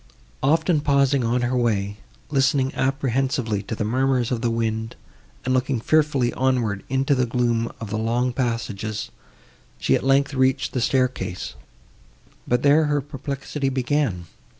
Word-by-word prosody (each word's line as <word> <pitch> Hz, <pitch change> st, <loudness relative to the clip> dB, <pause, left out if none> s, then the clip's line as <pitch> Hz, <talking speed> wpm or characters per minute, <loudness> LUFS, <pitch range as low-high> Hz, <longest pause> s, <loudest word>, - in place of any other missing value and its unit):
Often 160 Hz, +2 st, +2 dB
pausing 140 Hz, -2 st, +2 dB
on 120 Hz, +2 st, +1 dB
her 120 Hz, +1 st, 0 dB
way, 105 Hz, -4 st, 0 dB, 0.3 s
listening 135 Hz, -1 st, +2 dB
apprehensively 130 Hz, -5 st, 0 dB
to 110 Hz, +3 st, -5 dB
the 110 Hz, -, -2 dB
murmurs 125 Hz, +2 st, +1 dB
of 120 Hz, -2 st, -1 dB
the 120 Hz, -, +1 dB
wind, 115 Hz, -1 st, -2 dB, 0.5 s
and 130 Hz, -, +1 dB
looking 130 Hz, -1 st, +1 dB
fearfully 140 Hz, -2 st, +2 dB
onward 120 Hz, -6 st, 0 dB
into 135 Hz, +2 st, +2 dB
the 125 Hz, -2 st, +1 dB
gloom 120 Hz, -1 st, 0 dB
of 110 Hz, -2 st, -7 dB
the 110 Hz, -, -1 dB
long 120 Hz, +3 st, 0 dB
passages, 115 Hz, -4 st, -3 dB, 0.7 s
she, -, -, +1 dB
at -, -, +1 dB
length, 140 Hz, +1 st, +3 dB
reached 130 Hz, 0 st, +1 dB
the 125 Hz, -, -1 dB
staircase; 125 Hz, -8 st, -1 dB, 0.9 s
but 125 Hz, +1 st, +1 dB
there 145 Hz, +2 st, +5 dB
her 145 Hz, -1 st, +1 dB
perplexity 140 Hz, 0 st, -4 dB
began. 130 Hz, -8 st, 0 dB
130 Hz, 145 wpm, -23 LUFS, 115-135 Hz, 0.9 s, there